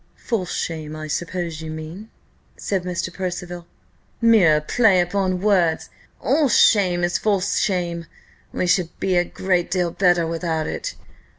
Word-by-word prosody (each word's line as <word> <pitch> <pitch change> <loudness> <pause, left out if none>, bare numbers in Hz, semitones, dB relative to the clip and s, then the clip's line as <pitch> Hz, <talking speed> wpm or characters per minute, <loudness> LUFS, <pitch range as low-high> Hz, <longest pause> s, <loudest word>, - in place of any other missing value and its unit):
"False 200 -7 -3
shame, 155 -2 -4
I 155 0 -6
suppose 170 0 -4
you 160 - -6
mean?" 160 +7 -8 0.5
said 195 -2 -2
Mr. 180 0 -3
Percival. 175 -2 -5 0.5
"Mere 210 -10 +5
play 195 +4 +3
upon 185 +1 0
words! 185 -6 +1 0.3
All 285 +4 +2
shame 185 -5 +4
is 175 0 +1
false 200 -2 +1
shame 170 -3 -1 0.4
we - - -1
should 180 -1 +2
be 190 -1 0
a 175 - +4
great 180 -1 -1
deal 180 -2 0
better 175 -2 +2
without 165 -1 -2
it. - - -4
180 Hz, 140 wpm, -22 LUFS, 170-195 Hz, 0.5 s, Mere